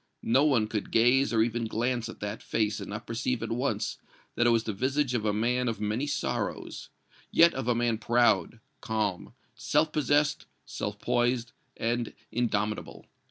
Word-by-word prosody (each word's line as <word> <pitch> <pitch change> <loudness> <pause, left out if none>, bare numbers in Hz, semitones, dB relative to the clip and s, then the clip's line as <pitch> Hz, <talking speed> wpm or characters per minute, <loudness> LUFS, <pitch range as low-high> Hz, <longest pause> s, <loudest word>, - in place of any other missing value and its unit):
No 130 +6 +4
one 130 -8 +3
could 105 -2 -3
gaze 125 +4 +4
or 110 -2 +4
even 115 0 -1
glance 120 +1 -1
at - - -10
that 105 +1 -4
face 105 -1 -1
and - - -7
not 105 +1 -6
perceive 115 +1 -2
at 115 - -4
once 125 +4 -1 0.3
that 120 - +2
it - - +6
was 115 -1 +3
the 110 - -3
visage 130 +5 0
of 110 -3 -1
a 105 - +3
man 120 +4 0
of 115 -2 -2
many 105 +7 -1
sorrows 145 -2 -3 0.4
yet 170 0 +6
of 135 -3 -4
a 120 - +3
man 120 -2 +1
proud, 115 -1 +2 0.2
calm, 105 0 -2 0.2
self 145 +7 +1
possessed, 150 0 +1 0.2
self - - -4
poised 120 -1 0 0.3
and 120 0 -1 0.2
indomitable. 105 -3 -2
120 Hz, 170 wpm, -28 LUFS, 110-125 Hz, 0.4 s, it